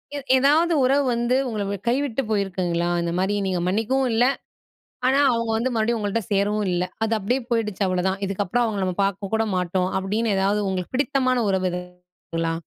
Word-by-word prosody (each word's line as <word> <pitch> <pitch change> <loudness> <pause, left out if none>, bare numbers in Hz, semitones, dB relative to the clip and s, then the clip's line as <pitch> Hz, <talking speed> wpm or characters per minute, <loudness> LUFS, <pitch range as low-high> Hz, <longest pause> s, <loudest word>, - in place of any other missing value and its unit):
எ - - -2 0.2
எதாவது 305 +6 +3
உறவு 275 +2 +3
வந்து 240 +2 +1
உங்களை 200 -2 -2
கைவிட்டு 270 0 0
போயிருக்குங்களா? 180 -4 0
இந்த 170 0 -2
மாதிரி 195 +2 +1
நீங்க 185 -2 -1
மன்னிக்கவும் 235 +7 +1
இல்ல. 240 +2 +4 0.8
ஆனா, 270 +2 +3
அவுங்க 230 -1 -1
வந்து 245 +3 -1
மறுபடியும் 225 +1 +1
உங்கள்ட்ட 210 +2 -1
சேரவும் 205 +1 +1
இல்ல. 175 0 0 0.2
அது 225 0 +1
அப்படியே 240 +6 0
போயிடுச்சு 215 -4 -1
அவ்வளதான். 185 +1 0
இதுக்கப்புறம் 200 +4 0
அவுங்கள 205 -4 -2
நம்ம 185 - -2
பாக்க 195 0 -2
கூட 225 - +1
மாட்டோம் 180 0 0
அப்படின்னு 210 +3 -1
எதாவது 200 +2 +1
உங்களுக்கு 185 +1 -3
பிடித்தமான 260 -3 +1
உறவு 190 -1 +1
எதா 180 0 -3 0.5
களா? 165 0 0
210 Hz, 170 wpm, -23 LUFS, 190-240 Hz, 0.8 s, இல்ல